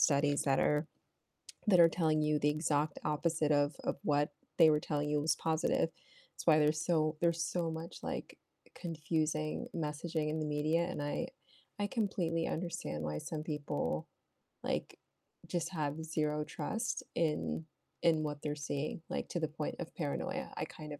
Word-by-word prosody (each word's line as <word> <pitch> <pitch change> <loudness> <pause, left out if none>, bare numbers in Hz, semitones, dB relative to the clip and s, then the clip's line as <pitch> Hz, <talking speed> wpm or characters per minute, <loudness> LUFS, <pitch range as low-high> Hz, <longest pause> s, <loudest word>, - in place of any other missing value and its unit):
studies 145 0 +4
that 135 -1 +3
are 150 +1 +3 0.8
that 185 -3 +7
are 165 - +9
telling 160 -2 +2
you 150 0 +3
the 145 - +3
exact 150 -1 +1
opposite 155 0 +2
of 145 0 +3
of - - +1
what 145 0 +2 0.3
they 165 -2 +9
were 150 -1 +3
telling 150 -1 -1
you 150 0 +2
was 155 +2 +2
positive, 160 0 +2 0.5
it's - - -7
why 155 -2 +7
there's 155 +1 +3
so 155 -2 +2
there's 170 -1 +2
so 170 -2 0
much, 160 +1 -6
like, - - -4 0.4
confusing 155 -2 -1
messaging 155 0 -1
in 155 - -1
the - - 0
media, 155 +3 +2
and 180 - -4
I 145 - -1 0.5
I 205 - +1
completely 180 -7 0
understand 165 - -3
why 75 0 -2
some 155 - -4
people, 145 - -2 0.6
like, - - -2 0.5
just 170 -1 -1
have 150 0 -1
0 150 -1 0
trust 170 +10 -2
in 80 - 0 0.4
in 160 -2 +5
what 145 -1 -3
they're 150 -1 -1
seeing, 145 +2 -3
like - - -2
to 175 - -1
the 160 - +1
point 150 0 -4
of 170 - -6
paranoia, 265 - -2
I - - -1
kind 150 -1 -8
of 145 - -8
155 Hz, 170 wpm, -34 LUFS, 150-165 Hz, 0.8 s, are